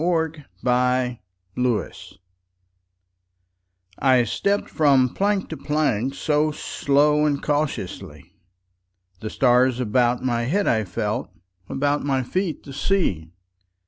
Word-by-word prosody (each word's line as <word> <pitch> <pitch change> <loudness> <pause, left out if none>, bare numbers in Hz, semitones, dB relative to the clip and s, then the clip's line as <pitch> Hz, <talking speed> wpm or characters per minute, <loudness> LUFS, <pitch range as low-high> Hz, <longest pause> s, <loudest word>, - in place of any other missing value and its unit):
Part 160 -2 0 0.3
One: - - -12
Life 125 0 +1 0.4
CXXXVI 125 -6 -2 1.8
I 130 -2 +4
STEPPED 200 - -1
from 135 -5 +3
plank 200 -1 0
to 160 - -6
plankSo 150 +1 0
slow 150 +2 +2
and 145 -2 -1
cautiously; 145 0 -3 0.9
The 110 - -5
stars 125 0 +3
about 120 +1 +1
my 120 -2 0
head 195 +10 0
I 110 -2 +1
felt, 90 - -3 0.4
About 145 +2 0
my 135 -2 0
feet 175 +3 -2
the 140 - -10
sea. 135 - 0
135 Hz, 110 wpm, -23 LUFS, 125-150 Hz, 1.8 s, I